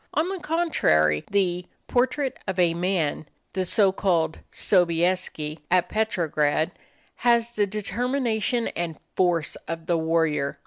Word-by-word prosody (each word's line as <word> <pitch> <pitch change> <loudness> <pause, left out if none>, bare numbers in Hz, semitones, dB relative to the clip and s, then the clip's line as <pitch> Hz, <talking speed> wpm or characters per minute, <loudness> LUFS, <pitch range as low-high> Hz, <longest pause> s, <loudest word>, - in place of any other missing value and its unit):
On 320 +4 +1
the 385 -1 -4
contrary, 80 - +2
the 180 -3 0 0.2
"Portrait 260 +2 +1
of 190 0 -2
a 175 -2 +3
Man" 170 -4 -1 0.3
the 185 +1 0
so 195 +1 +3
called 170 -5 0
Sobieski, 170 -3 +1
at 180 -1 +2
Petrograd, 160 -8 0 0.5
has 235 -1 +3
the 210 -3 +1
determination 235 +2 -1
and 170 -2 -4 0.2
force 175 -4 +1
of 165 -1 -5
the 170 -2 +1
warrior. 160 -3 0
180 Hz, 125 wpm, -25 LUFS, 165-220 Hz, 0.5 s, a